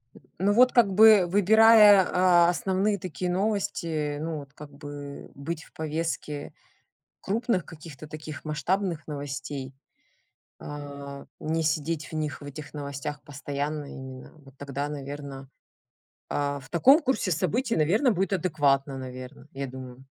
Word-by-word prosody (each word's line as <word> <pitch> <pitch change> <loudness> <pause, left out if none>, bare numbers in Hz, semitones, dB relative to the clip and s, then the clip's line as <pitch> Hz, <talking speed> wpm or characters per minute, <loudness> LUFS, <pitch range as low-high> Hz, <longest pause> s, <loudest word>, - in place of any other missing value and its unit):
М, - - -16 0.2
ну 195 +3 +3
вот, 250 +3 +6
как 230 -5 +4
бы, 215 -2 +7
выбирая, 205 +1 +7
а, 175 -1 +5
основные 190 +4 0
такие 180 +1 -3
новости, 170 -7 -1
ну 160 0 -3
вот, 140 -1 -12
как 150 -1 -11
бы 145 0 -9
быть 160 +4 -5
в - - -20
повестке 155 -2 -4 0.7
крупных 215 -3 -1
каких-то 155 -2 -11
таких 155 0 -8
масштабных 165 +2 -1
новостей, 140 -2 -6 0.8
а 140 -1 -8 0.2
не 160 +1 -1
сидеть 155 +1 -1
в - - -16
них, 150 -3 -3
в - - -11
этих 145 +1 -9
новостях 145 0 -5
постоянно 145 +1 -4
именно. 130 -1 -10
Вот 135 0 -17
тогда, 140 0 -4
наверно, 140 -1 -7 0.8
а, 145 -1 -1
в 135 - -15
таком 265 - +6
курсе 260 -8 0
событий, 220 - 0
наверно, 205 - +3
будет 195 0 -1
адекватно, 145 -6 +1
наверно, 130 +2 -9
я 140 0 -4
думаю. 130 0 -10
150 Hz, 135 wpm, -27 LUFS, 140-185 Hz, 0.8 s, бы